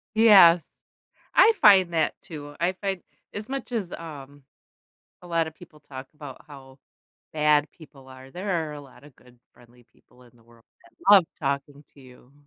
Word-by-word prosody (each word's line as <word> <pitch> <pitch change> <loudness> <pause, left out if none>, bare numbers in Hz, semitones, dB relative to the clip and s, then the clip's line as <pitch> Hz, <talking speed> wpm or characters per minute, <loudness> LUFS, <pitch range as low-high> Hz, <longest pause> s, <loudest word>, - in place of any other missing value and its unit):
Yes. 190 -7 +6 0.7
I 450 - +6
find 190 -5 +5
that 160 -2 0
too. 145 -3 -11
I 175 +3 0
find 190 -1 -5 0.3
As 210 +1 -7
much 270 -2 -6
as, 215 -7 -4
um, 145 -4 -11 0.8
a - - -13
lot 165 -1 -1
of 160 - -10
people 160 -3 -17
talk 130 -1 -11
about 145 -4 -12
how 135 -1 -15 0.5
bad 150 -1 +1
people 140 -5 -17
are, 130 0 -14
there 175 -3 -3
are - - -8
a 145 - -9
lot 135 -1 -18
of 145 - -17
good 125 -1 -22 0.2
friendly 120 0 -22
people 125 0 -25
in 120 - -22
the 115 - -25
world 115 0 -23 0.2
that 115 - -22 0.2
love 190 -4 +7 0.2
talking 140 0 -4
to 140 - -18
you. 130 0 -19
150 Hz, 180 wpm, -24 LUFS, 135-175 Hz, 0.8 s, love